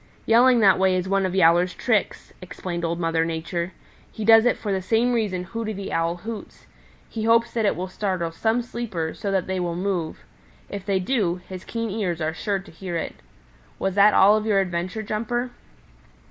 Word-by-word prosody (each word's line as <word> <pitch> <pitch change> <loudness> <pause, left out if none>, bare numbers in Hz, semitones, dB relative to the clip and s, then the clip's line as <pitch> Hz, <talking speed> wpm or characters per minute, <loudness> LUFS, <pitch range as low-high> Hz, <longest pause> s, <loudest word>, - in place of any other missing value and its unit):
"Yelling 240 +1 +5
that 195 -3 +5
way 190 -1 +3
is 185 0 -1
one 195 0 +1
of 185 - -4
Yowler's 175 0 +4
tricks," 220 -5 -1
explained 180 -1 -6
Old 170 0 -1
Mother 165 -1 +1
Nature. 170 +2 -3 0.4
"He 215 - -5
does 225 +1 +7
it 245 - +2
for 210 - -4
the 190 -1 0
same 225 +6 +1
reason 205 -6 -1
Hooty 220 +3 -4
the 200 -1 -6
Owl 165 +1 0
hoots. 215 +4 -8 0.4
He 220 -1 -4
hopes 230 +1 +3
that 225 -2 0
it - - +1
will 185 +1 -4
startle 185 -3 -2
some 225 +8 0
sleeper 215 -10 -4
so 200 - -4
that 190 -2 0
they 190 0 -2
will 175 -1 -2
move. 180 -3 -3 0.4
If 200 -1 -7
they 195 -1 +2
do, 185 -4 0
his 185 -1 -8
keen 230 -2 -4
ears 190 -5 -2
are 160 0 -1
sure 200 +5 -1
to 195 - -11
hear 175 +1 -5
it. 165 - -5 0.6
Was 195 -1 -1
that 205 +2 +5
all 200 +2 +6
of 215 0 -1
your 205 -2 +3
adventure, 185 +3 -2
Jumper?" 240 +4 -2
195 Hz, 200 wpm, -24 LUFS, 175-220 Hz, 0.6 s, does